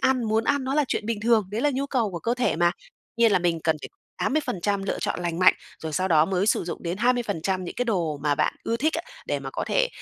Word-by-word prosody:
ăn, 260 -2 +2
muốn 220 +1 +1
ăn 285 0 +1
nó 265 +2 -1
là 300 -1 +3
chuyện 210 - -2
bình 225 -2 -2
thường, 220 -3 +3
đấy 215 +3 -2
là 295 - +3
nhu 275 +1 -1
cầu 235 -7 0
của 170 - -5
cơ 235 +6 0
thể 250 0 0
mà. 175 +1 +4 0.5
Nhiên 230 -2 +4
là - - +5
mình 170 -2 0
cần 160 -1 +2
phải - - -6 0.3
80% 205 - 0
lựa 195 - -2
chọn - - -2
lành 170 -1 -2
mạnh, 185 0 +6 0.3
rồi 160 -1 -4
sau 185 +5 0
đó 155 -3 +5
mới 190 +2 0
sử - - +2
dụng 170 - -6
đến 175 +1 -2
20% 205 -7 0
những 175 - -6
cái 245 - -1
đồ 175 -9 0
mà 145 -1 +2
bạn - - +1
ưa 230 - 0
thích 305 +7 +1
á, 330 - -1 0.2
để - - -1
mà - - -6
có - - -3
thể, - - +1
210 Hz, 275 wpm, -25 LUFS, 175-245 Hz, 0.5 s, mạnh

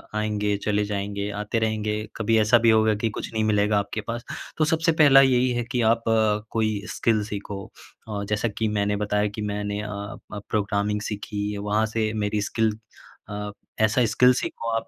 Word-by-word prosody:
आएँगे, 105 -1 0
चले 105 -1 +1
जाएँगे, 100 0 -3
आते 110 +2 -1
रहेंगे, 110 -1 -1 0.2
कभी 115 0 +1
ऐसा 110 +2 +5
भी 115 - +7
होगा 110 -1 +4
कि 115 - +2
कुछ 110 - -6
नहीं 110 0 0
मिलेगा 105 -1 +2
आपके 100 +2 -4
पास। 120 0 -4 0.3
तो 155 - +3
सबसे 165 +1 +2
पहला 135 -2 +8
यही 130 -1 +3
है 120 0 -1
कि 125 - +1
आप 115 0 -4
अ, 110 -1 +3
कोई 110 -2 0
स्किल 110 -2 +2
सीखो 100 -1 -6 0.4
अ, 100 -1 -3
जैसा 105 +2 +1
कि 110 - +1
मैंने 105 0 +1
बताया 105 0 +1
कि - - -3
मैंने 105 0 -3
अ 105 - -5
अ, 100 0 -7
प्रोग्रामिंग 105 -1 0
सीखी, 105 -1 -4
वहाँ 105 +2 +1
से 110 -1 +1
मेरी 105 0 0
स्किल 110 -2 +1 0.5
अ, 105 0 -4 0.3
ऐसा 110 +3 +3
स्किल 125 +3 +5
सीखो 115 -1 -3
आप 115 - -2
105 Hz, 185 wpm, -24 LUFS, 105-115 Hz, 0.5 s, पहला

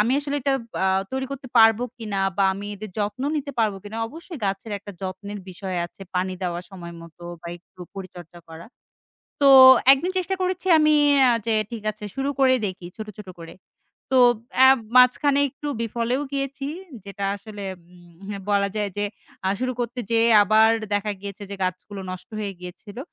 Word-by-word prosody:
আমি 230 +4 +2
আসলে 285 0 -3
এটা 275 +1 0 0.3
আ - - +3 0.3
তৈরি 265 0 -2
করতে 270 -2 -7
পারব 225 0 +7 0.2
কিনা, 210 -3 -3 0.2
বা 195 - +3
আমি 200 +2 -7
এদের 210 +1 -8
যত্ন 210 +5 -2
নিতে 285 -1 -3
পারবো 215 -3 +1
কিনা। 210 +2 -8
অবশ্যই 330 +2 -10
গাছের 195 +2 -3
একটা 205 +1 -10
যত্নের 195 +2 -6
বিষয় 185 0 -5
আছে। 175 - -27
পানি 185 +1 0
দেওয়ার 175 0 -3
সময় 170 -3 -9
মতো 170 +1 -15 0.2
বা - - -9
একটু 180 +1 -22
পরিচর্যা 175 -3 -10
করা। 165 +1 -11 0.7
তো 280 - +4 0.5
একদিন 275 +7 +1
চেষ্টা 370 +1 -1
করেছি, 370 0 -2
আমি 305 0 +4 0.3
আ - - +5 0.2
যে 225 - +2 0.2
ঠিক 230 -3 -6
আছে 210 0 -11
শুরু 270 +1 -1
করে 260 -1 +5
দেখি 185 -2 -7
ছোট, 220 - -6
ছোট 205 - -10
করে। 165 0 -10 0.6
তো 265 - +2 0.4
অ্যা 265 0 +7 0.3
মাঝখানে 275 +3 +5
একটু 290 +2 -8
বিফলেও 235 +4 -1
গিয়েছি। 275 0 -3 0.4
যেটা 200 0 -6
আসলে 205 0 -10 0.2
উম 175 +2 -12
এহ, - - -8
বলা 200 -1 +2
যায় 205 -1 -1
যে 205 - 0 0.4
আ - - +3
শুরু 255 0 -1
করতে 240 +1 -4
যেয়ে, 230 0 +3
আবার 220 +2 +5 0.2
দেখা 205 +1 -1
গিয়েছে 200 +1 -8
যে 200 - -4
গাছগুলো 185 +2 -4
নষ্ট 185 -1 -8
হয়ে 200 -2 -3
গিয়েছিল। 190 +5 -10
210 Hz, 180 wpm, -23 LUFS, 190-255 Hz, 0.7 s, পারব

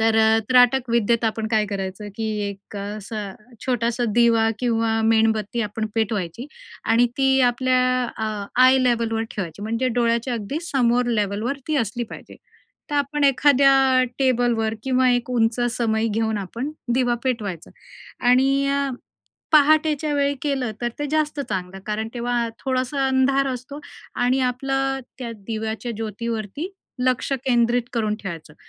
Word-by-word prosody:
तर 225 0 +3 0.3
त्राटक 250 0 +4
विद्येत 235 0 +2
आपण 220 0 -1
काय 215 -2 +3
करायचं, 195 0 -5
की 225 - -3 0.2
एक 200 +1 -10
असं 205 0 -5 0.3
छोटासा 240 -1 0
दिवा 230 -2 +4
किंवा 225 -2 +1
मेणबत्ती 220 0 +2
आपण 215 +1 -3
पेटवायची 220 0 -2 0.4
आणि 230 +2 +4
ती 270 -1 +3 0.2
आपल्या 255 +1 +1 0.4
आ, 210 -2 -3 0.2
आय 260 +1 +6
लेव्हलवर 230 -3 +1
ठेवायची. 190 -1 -6
म्हणजे 230 +4 -1
डोळ्याच्या 235 +1 0
अगदी 230 +6 -3
समोर 245 -2 +2
लेव्हलवर 220 +3 -1
ती 310 - +1
असली 235 -1 -1
पाहिजे. - - -11 0.5
तर - - -2
आपण 285 +1 0
एखाद्या 275 0 +5 0.4
टेबलवर 240 -4 +1
किंवा 260 0 +2
एक 245 0 0
उंच 230 -1 +1
समई 225 -2 0
घेऊन 220 0 -1
आपण 230 +8 -5 0.2
दिवा 245 -1 +2
पेटवायचा 210 -10 -3 0.6
आणि 270 +2 +4
अ, 280 0 0 0.6
पहाटेच्या 305 0 +4
वेळी 285 0 +1
केलं 270 -5 -1
तर 240 - 0
ते 290 - -2
जास्त 305 -1 0
चांगलं. 190 -7 -4
कारण 215 +1 -2
तेव्हा 240 -1 -1
थोडासा 265 +1 -1
अंधार 265 +1 +2
असतो 255 +3 -6 0.4
आणि 250 +2 +1
आपलं 270 +2 -1 0.2
त्या 245 -3 -5
दिव्याच्या 220 +3 -4
ज्योतीवरती 225 - -4 0.4
लक्ष 255 +1 0
केंद्रित 240 -1 +2
करून 220 -3 0
ठेवायचं 165 -6 -7
235 Hz, 135 wpm, -22 LUFS, 220-260 Hz, 0.6 s, आय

